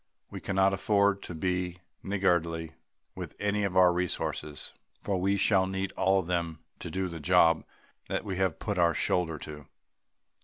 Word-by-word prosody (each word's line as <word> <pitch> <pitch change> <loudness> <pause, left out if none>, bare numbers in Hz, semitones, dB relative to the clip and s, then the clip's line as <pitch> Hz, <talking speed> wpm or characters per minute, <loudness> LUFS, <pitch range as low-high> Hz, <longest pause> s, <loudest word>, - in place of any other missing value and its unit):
We - - -7
cannot 95 0 +2
afford 100 0 +2
to 85 - -7
be 90 +1 -1 0.2
niggardly 85 -5 0 0.4
with - - -7
any 105 0 0
of 95 -2 -1
our 90 -1 +7
resources, 85 -4 -2 0.3
for 95 -3 -2
we 100 +2 +2
shall 95 -1 +3
need 95 0 -2
all 95 0 +2
of - - -10
them 85 -2 -1 0.2
to - - -6
do 95 +3 -2
the 85 -2 -6
job 85 0 +4 0.4
that - - -2
we 95 -3 -4
have 95 -3 +1
put 105 -4 -2
our 85 -2 +4
shoulder 85 -3 0
to. 75 -1 -9
90 Hz, 165 wpm, -29 LUFS, 85-95 Hz, 0.4 s, our